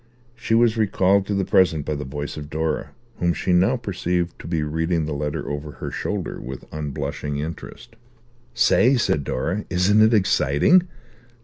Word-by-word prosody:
She 115 -1 -1
was 115 -1 +3
recalled 100 -2 +2
to 100 - -1
the 100 -1 0
present 80 -7 +2
by - - -2
the 75 0 -4
voice 75 +2 -5
of 75 -1 -8
Dora, 80 0 -2 0.3
whom 85 -1 +1
she 90 - 0
now 95 +9 +3
perceived 90 -5 -2
to - - -9
be 80 -3 -1
reading 80 +2 -1
the 75 - -3
letter 75 0 -3
over 75 0 -5
her - - -6
shoulder - - -4
with 65 +1 -8
unblushing 75 -1 -4
interest. 85 +10 -7 0.6
"Say," 120 +2 +4
said 75 -10 +1
Dora, 85 +11 -2
"isn't 95 +4 +3
it 110 +1 +5
exciting? 95 - +3
85 Hz, 170 wpm, -22 LUFS, 75-105 Hz, 0.6 s, it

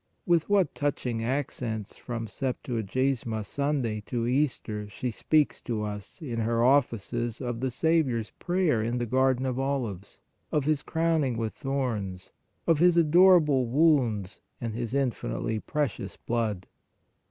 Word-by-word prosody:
With 170 -1 +2
what 195 -7 +3
touching 125 -5 -2
accents 120 -4 -3
from 115 -2 -5
Septuagesima 120 0 -2
Sunday 135 -4 -1
to 120 -2 -1
Easter 120 -5 -1
she 120 +5 -3
speaks 150 +6 +1
to 110 -3 -3
us 105 - -6
in 120 -6 -3
her 115 +1 +1
Offices 120 -3 +1
of 120 -2 -3
the 130 +1 0
Saviour 155 -1 +2
s 110 -4 -5
prayer 175 -9 +1
in 120 +3 -1
the 120 - -1
garden 130 +2 +2
of 130 -1 -1
olives, 125 -9 -3 0.3
of 150 -3 +1
His 150 -2 +1
crowning 160 -7 0
with 110 -1 -2
thorns, 115 -10 -3 0.3
of 165 -3 +3
His 175 0 +5
adorable 165 -5 +5
wounds 120 - +2 0.2
and 115 -2 -3
His 120 +2 -3
infinitely 110 - -1
precious 140 -8 -3
blood! 110 -5 -2
125 Hz, 140 wpm, -28 LUFS, 115-145 Hz, 0.3 s, His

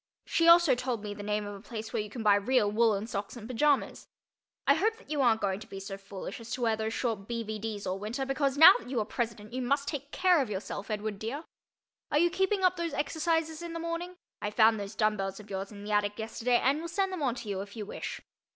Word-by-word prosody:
She 330 - +2
also 335 -4 +8
told 245 -3 -2
me 205 -1 -4
the 205 - -8
name 210 0 -1
of 205 - -6
a 200 - -10
place 220 0 -7
where - - +1
you 210 - -6
can 225 +2 -6
buy 210 -1 +6
real 205 +1 +2
woolen 215 -2 +2
socks 205 +1 -5
and 225 -2 -8
pajamas. 280 +3 +1 0.6
I - - +6
hope 445 +2 +1
that 470 - -15
you 295 -2 +1
aren't 230 -4 +3
going 195 -1 0
to 215 - -11
be 195 - -7
so 195 0 -6
foolish 195 +1 -8
as 230 0 -10
to 250 - -4
wear 225 -2 +2
those 220 +1 -3
short 220 -5 -2
B. 230 -1 -2
V. 215 0 -5
D.'s 210 -1 -4
all 185 +1 -2
winter 230 +6 -3
because 270 0 0
now 320 - +11
that - - -11
you 255 -3 0
are 215 - 0
president 220 -2 -4
you 255 - -2
must 280 +3 0
take 285 -1 -4
care 365 -4 +4
of 255 - -2
yourself, 200 +1 -5
Edward 210 -1 -3
dear. 245 +9 -4 0.7
Are - - +2
you 345 +3 +4
keeping 385 +2 +1
up 365 0 +4
those 340 -1 -2
exercises 320 0 0
in 340 -1 -6
the 335 - -4
morning? 335 +2 -4 0.3
I 205 - -1
found 220 0 +4
those 200 +1 -6
dumb 215 -1 +2
bells 195 0 -3
of 210 -1 -12
yours 195 +1 -4
in 205 -1 -10
the 210 - -5
attic 205 0 +1
yesterday 230 +2 0
and 280 +5 +1
will 335 - -4
send 385 +2 -1
them 365 - -4
on 255 -4 +1
to 235 - -8
you 195 -2 -2
if 200 +2 -9
you 215 -2 -5
wish. - - -6
225 Hz, 265 wpm, -30 LUFS, 210-290 Hz, 0.7 s, now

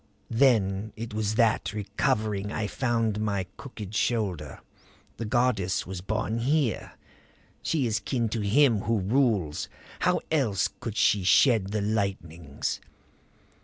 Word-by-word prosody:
"Then 110 -5 +2
it 115 -1 -6
was 110 0 -1
that, 110 -4 +2
recovering, 105 0 -1
I 110 - -2
found 115 -1 0
my 100 -3 -1
crooked 110 -7 -9
shoulder. 100 -10 -1 0.6
The 115 - -4
goddess 110 -5 +1
was 95 0 -6
born 110 +3 -2
here. 135 0 0 0.7
She 150 -6 0
is 110 -2 0
kin 120 -3 -1
to 110 0 -2
Him 115 +2 +4
Who 115 +1 +2
Rules! 100 - +1 0.3
How - - +2
else 115 - +1
could 110 -2 -5
she 100 -3 +3
shed 105 +2 +5
the 105 +1 -2
lightnings? 95 -8 -2
110 Hz, 130 wpm, -27 LUFS, 100-115 Hz, 0.7 s, shed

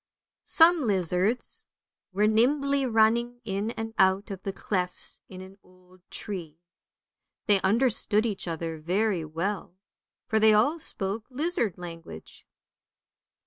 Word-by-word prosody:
SOME 325 -5 +5
lizards 190 +4 0 0.5
were 200 +3 +2
nimbly 275 +5 +2
running 235 +2 +2
in 200 +1 -2
and 225 -1 -5
out 190 +2 +3
of 195 -1 -6
the 195 - -3
clefts 185 -2 -2
in 185 -1 -9
an 190 +1 -13
old 185 0 -23
tree. 175 -7 -6 0.9
They 200 -2 +3
understood 220 0 +2
each 205 -5 -3
other 165 -1 -4
very 185 +2 0
well, 170 +4 -4 0.5
for 220 - +1
they 215 0 +6
all 285 +10 +2
spoke 205 -5 -3
lizard 275 - -1
language. 165 - -10
205 Hz, 120 wpm, -27 LUFS, 185-230 Hz, 0.9 s, they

